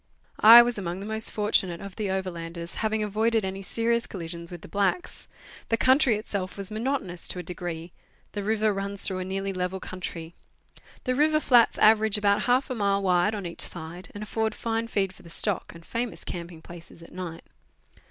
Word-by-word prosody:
I 230 +2 +11
was 240 -3 -2
among 180 -1 -4
the 200 - -6
most 220 +1 -2
fortunate 195 -5 +1
of 200 -1 -9
the 210 -3 -2
overlanders, 170 -2 -4
having 220 -1 0
avoided 220 +1 +1
any 190 +1 -4
serious 230 +4 0
collision 170 -2 -6
with 175 -2 -8
the - - -9
blacks. 205 - -1 0.4
The 225 - +2
country 260 -1 +4
itself 200 -3 -4
was 200 0 -3
monotonous 215 -6 -2
to - - -3
a 180 - -4
degree; 170 -1 -6 0.4
the 205 - -4
river 215 +1 +1
runs 200 0 -4
through 185 -2 +1
a - - -2
nearly 195 +1 -3
level 185 +1 -2
country. 175 -3 -7 0.7
The 255 - 0
river 305 +3 +3
flats 245 -6 +4
average 220 -1 +5
about 200 -1 +2
half 255 +2 +2
a - - -1
rnile 200 -2 +1
wide 185 +3 +3
on 200 -3 -5
each 170 - -6
side, 170 +1 -5
and 205 - -5
afford 220 +1 -1
fine 230 0 -2
feed 195 -4 -1
for 190 - -16
the 170 - -14
stock, 200 +3 0
and 165 0 -13
famous 235 0 -4
camping 170 -2 -7
places 170 -1 -12
at - - -14
night. 175 -2 -6
200 Hz, 190 wpm, -26 LUFS, 180-220 Hz, 0.7 s, I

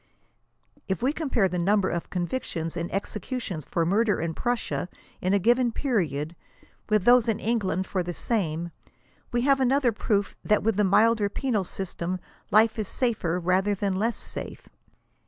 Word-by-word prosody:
If 190 +4 -2
we 270 +3 +2
compare 270 -11 +1
the 180 -1 -2
number 200 +2 +2
of 170 - -3
convictions 175 -3 -3
and 170 0 -3
executions 200 - -4
for 170 - 0
murder 205 +4 +2
in 165 0 -2
Prussia, 240 -4 -2 0.3
in 185 - +1
a 200 - +4
given 240 +4 +3
period, 170 - -1 0.5
with 215 -3 +3
those 245 -1 +6
in 220 - 0
England 195 -5 0
for 190 - -1
the 175 0 -3
same, 170 -5 -2 0.6
we 240 - +1
have 275 +1 +3
another 260 -1 +3
proof 205 -2 -1
that 210 -1 +2
with 220 -2 +1
the 210 - +3
milder 210 +2 +4
penal 220 -2 -1
system 185 -1 -4 0.3
life 220 +3 +4
is 210 - -2
safer 195 -9 0
rather 185 +3 +2
than 200 0 -1
less 225 +4 0
safe. - - -6
205 Hz, 160 wpm, -26 LUFS, 180-235 Hz, 0.6 s, those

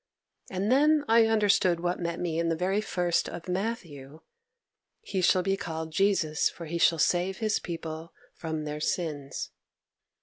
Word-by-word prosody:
And 195 +4 -1
then 300 +3 +4
I 225 0 +5
understood 200 -5 +3
what 175 +1 -1
met 170 -1 -3
me 165 -2 -1
in 170 0 +1
the 165 - +1
very 190 +5 0
first 175 -4 0
of 165 - -8
Matthew, 170 -8 -4 0.8
"He 190 - -2
shall 180 +1 +4
be 195 +1 +1
called 160 -4 -5
Jesus, 175 -4 +2
for 170 - -9
He 170 +2 -3
shall 165 -1 +4
save 180 +4 +1
His 215 -1 0
people 165 -1 -6 0.2
from 160 -1 -4
their 150 0 -4
sins." 150 -4 -3
175 Hz, 160 wpm, -28 LUFS, 160-195 Hz, 0.8 s, I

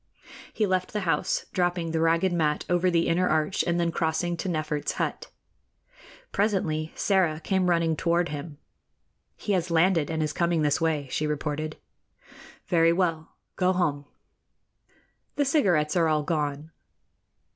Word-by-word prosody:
He 215 - 0
left 185 -2 -1
the 210 - -1
house, 165 -5 0
dropping 175 -2 0
the 160 - 0
ragged 165 +3 +2
mat 155 -3 0
over 175 +1 +2
the 170 -1 +2
inner 180 +2 +2
arch 155 +3 +1
and 170 0 +1
then 170 -1 +1
crossing 165 +1 -1
to 190 - -3
Nefert's 155 -3 -2
hut. - - -3 1.0
Presently 170 -7 0
Sĕra 175 -6 +1
came 190 -2 +1
running 165 -2 +2
toward 170 +2 +1
him. 145 0 -6 0.8
"He 205 - -2
has 180 -2 0
landed 165 -2 +2
and 160 -1 -1
is 150 -1 -2
coming 170 -2 +1
this 145 0 +1
way," 155 -4 0
she 155 - -1
reported. 150 +1 -3 0.9
"Very 165 -1 +3
well. 170 -3 -1 0.2
Go 185 0 +2
home." 150 -6 -1 1.3
"The 290 - +1
cigarettes 185 - +2
are 170 -2 +3
all 155 -1 +1
gone." 150 0 -2
165 Hz, 145 wpm, -26 LUFS, 155-180 Hz, 1.3 s, Very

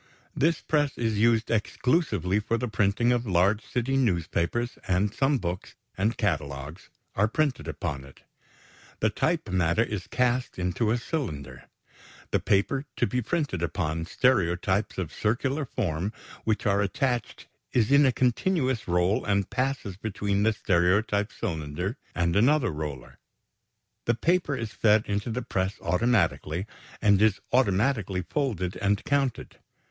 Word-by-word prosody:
This 155 +2 +2
press 145 -3 0
is 110 -3 0
used 115 0 +3
exclusively 110 - +1
for 115 +2 -1
the 125 +2 -2
printing 110 +2 +2
of 120 -1 0
large 95 +4 +2
city 125 +2 -1
newspapers, 110 +1 0
and 95 +3 +1
some 135 +1 +2
books, 90 -4 -5 0.2
and 105 +5 0
catalogues 75 -4 -3 0.2
are 105 +2 +2
printed 130 - -1
upon 75 -2 -4
it. 70 0 -16 0.8
The 110 - +2
type 165 +4 0
matter 90 +3 +2
is 105 -5 -5
cast 125 +1 0
into 90 +5 -1
to 110 - +2
a - - +1
cylinder. 75 - -5 0.7
The - - +2
paper 135 +8 +1
to - - +2
be 125 0 -1
printed 145 - -2
upon 80 -1 -2
stereotypes 95 -4 +1
of 90 -5 -3
circular 130 +7 0
form 100 -5 -2 0.3
which 110 +1 0
are 100 -1 +3
attached 125 +2 -1 0.3
is 120 0 +2
in 140 +1 +7
a - - +4
continuous 130 - 0
roll 90 +3 +2
and 100 -2 0
passes 130 -7 -2
between 100 -1 -1
the 110 +1 +3
stereotype 100 +3 +1
cylinder 80 - -3 0.2
and 85 -1 +1
another 125 +2 +3
roller. 75 -5 -6 0.9
The 120 - +2
paper 170 0 +1
is 115 -3 -5
fed 110 0 +3
into 100 +3 -2
the 120 +2 -2
press 95 -3 -1
automatically, 90 -3 +1 0.4
and 100 -2 +5
is 110 -3 +3
automatically 105 -4 +2
folded 100 - -2
and 100 0 0
counted. 140 -3 -1
105 Hz, 140 wpm, -27 LUFS, 90-125 Hz, 0.9 s, in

